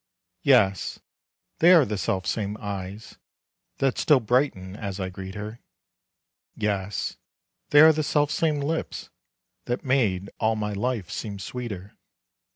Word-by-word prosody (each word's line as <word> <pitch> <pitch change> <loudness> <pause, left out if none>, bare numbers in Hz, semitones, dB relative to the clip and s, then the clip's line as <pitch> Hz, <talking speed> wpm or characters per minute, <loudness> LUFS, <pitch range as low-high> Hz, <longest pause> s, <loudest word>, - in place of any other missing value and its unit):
Yes, 100 - +3 0.6
they 170 +2 +7
are 165 -6 +7
the 105 - -3
self 95 -1 -1
same 105 -1 -2
eyes 100 +1 -6 0.6
That 135 -2 +1
still 150 -4 +5
brighten 110 -6 0
as 100 -2 -5
I 95 -1 -2
greet 95 +1 -8
her, 105 +3 -6 1.0
Yes, 100 -1 -2 0.5
they 145 - +7
are 160 0 +9
the 155 - -1
self 145 0 +1
same 155 -3 +1
lips 160 +3 -3 0.5
That 120 +5 -3
made 105 -8 +1
all 110 0 +2
my 105 -1 -2
life 105 -3 -2
seem 100 -2 -5
sweeter. 100 -3 -6
110 Hz, 135 wpm, -25 LUFS, 100-135 Hz, 1.0 s, are